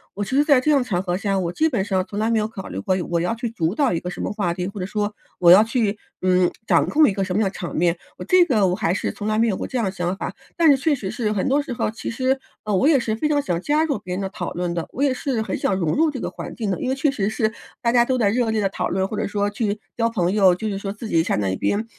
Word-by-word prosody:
我 205 - -2
其 200 - -7
实 290 - +5
在 285 -4 +5
这 305 +4 +1
样 285 - +5
的 - - 0
场 195 -8 -1
合 175 -2 -1
下， 195 +1 -1
我 175 -2 -1
基 320 - +2
本 225 -9 -1
上 190 -2 0
从 205 - -6
来 220 +2 +1
没 225 - +3
有 210 - 0
考 205 -4 -8
虑 - - -5
过 190 -3 0 0.2
我 170 - +1
要 180 +6 -1
去 235 +1 -3
主 175 -4 -1
导 280 -9 +2
一 165 - 0
个 180 - -5
什 - - -8
么 - - -2
话 200 -5 -1
题， 180 +1 -3
或 200 0 -7
者 185 - -3
说 210 0 -2 0.2
我 175 -2 +6
要 195 +4 +9
去， 220 -2 -1 0.2
嗯， 185 -1 +3
掌 - - +3
控 305 0 +5
一 200 - +1
个 195 -1 -1
什 185 -1 -3
么 - - +2
样 - - +1
的 - - -27
场 175 -4 -6
面， 170 +1 +2 0.2
我 - - -6
这 365 -1 +5
个 220 - +2
我 180 - +1
还 185 -4 0
是 - - -2
从 205 - -6
来 215 0 +1
没 230 - +3
有 200 - 0
过 - - -4
这 260 - -3
样 230 - +1
的 190 - -1
想 180 -1 -2
法。 - - -4 0.2
但 330 -3 +6
是 - - +6
确 290 +3 +1
实 200 -8 -5
是 215 -3 -1
很 200 -3 -1
多 280 +2 +3
时 280 - -7
候， 235 - -1
其 220 0 -6
实， 260 +3 0 0.2
呃， 210 -2 0
我 230 +10 +3
也 290 -5 +5
是 220 -2 -1
非 300 +7 -1
常 290 - +2
想 175 -10 -2
加 300 +6 +2
入 285 -9 -1
别 180 -3 -5
人 - - -3
的 195 - -2
讨 185 -3 -5
论 175 -1 -2
的， 170 -1 -3
我 275 - -2
也 275 -2 +3
是 255 -2 -2
很 - - -3
想 195 - 0
融 155 - +1
入 320 +2 +3
这 265 - -5
个 - - -3
环 - - -8
境 220 -4 -3
的。 185 - -2
因 255 - -2
为 265 - +1
确 280 +2 +1
实 200 -7 -1
是， 220 0 0 0.3
大 235 - +2
家 240 0 +4
都 260 - 0
在 210 -4 +3
热 235 +1 +1
烈 220 -1 0
地 195 - +1
讨 - - -2
论， 190 0 0
或 215 - -5
者 - - -1
说， 205 0 0
去 210 0 -2 0.2
交 230 -1 +2
朋 185 -6 0
友， 195 -3 +5
就 215 +4 -3
是 200 - -3
说 195 0 -4
自 220 +2 -8
己 165 -4 +3
站 105 - 0
在 95 - 0
一 95 - -1
边， 210 +2 0
210 Hz, 365 characters per minute, -22 LUFS, 185-250 Hz, 0.3 s, 要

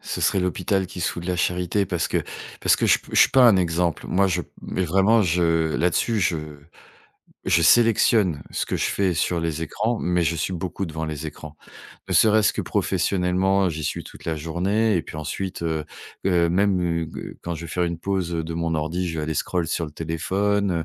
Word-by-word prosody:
ce - - -4
serait 95 - +2
l'hôpital 95 +1 0
qui 90 0 -8
se - - +1
fout 85 - -7
de 90 - -6
la 90 - 0
charité 90 +3 0
parce 85 -2 -2
que - - 0 0.4
parce - - +4
que - - 0
je - - +5 0.2
je - - +5
suis - - +7
pas 130 -1 +6
un 105 -5 +6
exemple. 85 -2 0
Moi 100 +1 +2
je 90 -1 0 0.2
mais 95 - -2
vraiment 95 +7 +3
je 85 -3 +1
là-dessus 90 +6 +1
je 90 -3 +1 1.1
je 85 - +3
sélectionne 105 -5 +4
ce - - -2
que - - -2
je - - 0
fais 95 -3 0
sur 85 +2 0
les 80 -1 -2
écrans, 110 +8 -2
mais 90 -1 +1
je 85 +1 0
suis 85 - -2
beaucoup 90 +1 -4
devant 80 0 -4
les 80 0 -5
écrans. 75 +1 -10 0.5
Ne - - 0
serait-ce 110 -1 +5
que - - -2
professionnellement, 95 +1 +1
j'y 80 -1 -5
suis 75 - -3
toute - - -13
la 80 -1 -1
journée 95 +7 0
et 85 - 0
puis - - -10
ensuite, 85 +5 -4
heu 80 -2 -2 0.4
heu, 85 -3 +3
même, 95 0 +2 0.3
heu, - - -8
quand 85 - -3
je 80 - -7
vais - - -8
faire 90 +2 -1
une 85 -1 -2
pause 95 -3 -2
de 80 0 -3
mon 85 -1 -1
ordi, 80 +4 -2
je 80 -1 -3
vais - - -2
aller 80 -1 -3
scroll 85 0 -1
sur 85 -1 -1
le 75 - -10
téléphone, 95 +5 -1
90 Hz, 215 wpm, -23 LUFS, 80-95 Hz, 1.1 s, suis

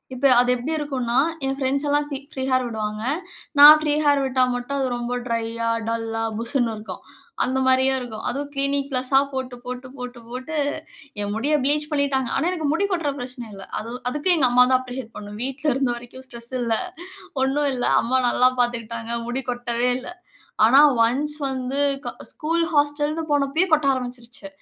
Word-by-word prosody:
இப்ப 255 +2 -2
அது 245 - +3
எப்டி 250 +6 -4
இருக்குன்னா, 255 -5 -2 0.3
என் 270 0 -1
ஃபிரண்ட்ஸ் 275 +2 0
எல்லாம் 290 0 +2
பி 275 - -2
ஃப்ரீ 265 - -4
ஹேர் 255 -1 +2
விடுவாங்க. 215 -1 -4 0.6
நான் 300 +2 +11
ஃப்ரீ 300 -1 0
ஹேர் 285 -1 +3
விட்டா 260 -1 +2
மட்டும் 245 +3 -4
அது 265 - 0
ரொம்ப 240 0 -3
ட்ரையா, 230 0 -2 0.2
டல்லா, 225 0 -2 0.2
புஸ்ஸுன்னு 235 0 0
இருக்கும். 215 0 -8 0.4
அந்த 260 +1 -1
மாரியே 260 +1 +4
இருக்கும். 230 -3 -7
அதுவும் 280 +3 -4
கிளினிக் 275 0 0
பிளஸ்ஸா 260 +1 +2
போட்டு, 260 -1 -4
போட்டு, 250 +1 -6
போட்டு, 250 -1 -7
போட்டு 255 +6 -6 0.7
என் 205 0 -2
முடிய 280 +7 0
ப்ளீச் 295 +2 +2
பண்ணிட்டாங்க. 275 -3 +1
ஆனா, - - +1
எனக்கு 315 -5 -2
முடி 400 +5 +1
கொட்ற 330 -6 0
பிரச்சன 245 -2 -6
இல்ல. 195 -1 -9
அது 225 - -7 0.2
அதுக்கு 295 +7 0
எங்க 275 -5 +4
அம்மாதான் 250 +1 +5
அப்ரிஷியேட் 250 -2 -7
பண்ணனும். 210 +1 -8
வீட்ல 270 +2 -1
இருந்த 265 -1 0
வரைக்கும் 245 +2 -11
ஸ்ட்ரெஸ் 235 0 -8
இல்ல. 230 -2 +1 0.7
ஒண்ணும் 285 +2 +1
இல்ல. 245 -1 -1 0.2
அம்மா 255 +3 +1
நல்லா 250 +1 +4
பாத்துக்கிட்டாங்க. 230 -1 -2
முடி 260 +2 -2
கொட்டவே 245 0 -1
இல்ல. 255 - -8 0.6
ஆனா, 265 +5 +7 0.3
ஒன்ஸ் 295 +5 -1
வந்து 260 +1 -3 0.5
ஸ்கூல் 330 +2 -1
ஹாஸ்டல்னு 295 +2 +1
போனப்பயே 290 +5 +2
கொட்ட 305 -2 +4
ஆரம்பிச்சிருச்சு. 245 +1 -6
260 Hz, 170 wpm, -23 LUFS, 240-280 Hz, 0.7 s, நான்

